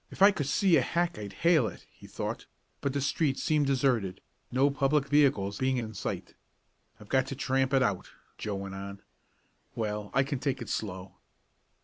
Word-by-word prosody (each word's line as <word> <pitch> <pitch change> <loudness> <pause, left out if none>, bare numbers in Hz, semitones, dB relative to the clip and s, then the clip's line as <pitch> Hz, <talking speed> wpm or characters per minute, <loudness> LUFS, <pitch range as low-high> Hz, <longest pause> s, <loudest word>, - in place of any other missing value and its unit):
"If - - 0
I 200 - +9
could 145 -8 -3
see 170 +4 +4
a - - +4
hack 170 +4 -1
I'd 100 -2 -6
hail 160 -9 +5
it," 95 - -9
he - - -15
thought, - - -5 0.3
but 140 - 0
the 140 +1 -1
streets 140 0 0
seemed 150 -2 +2
deserted, 125 -9 +1 0.3
no 135 +3 +3
public 140 +1 +2
vehicles 135 -9 +2
being 130 0 +1
in 110 -2 -4
sight. 100 - -5 0.7
"I've 105 - -13
got 130 +1 +2
to 135 - -4
tramp 135 -1 +1
it 135 -1 +4
out," 100 -6 -1 0.3
Joe 105 -2 -3
went 95 0 -5
on. 100 0 -7 0.7
"Well, 105 -2 -3
I 135 - +5
can 140 -1 -3
take 140 0 -1
it 120 - -7
slow." 95 -3 -4
130 Hz, 190 wpm, -29 LUFS, 105-140 Hz, 0.7 s, I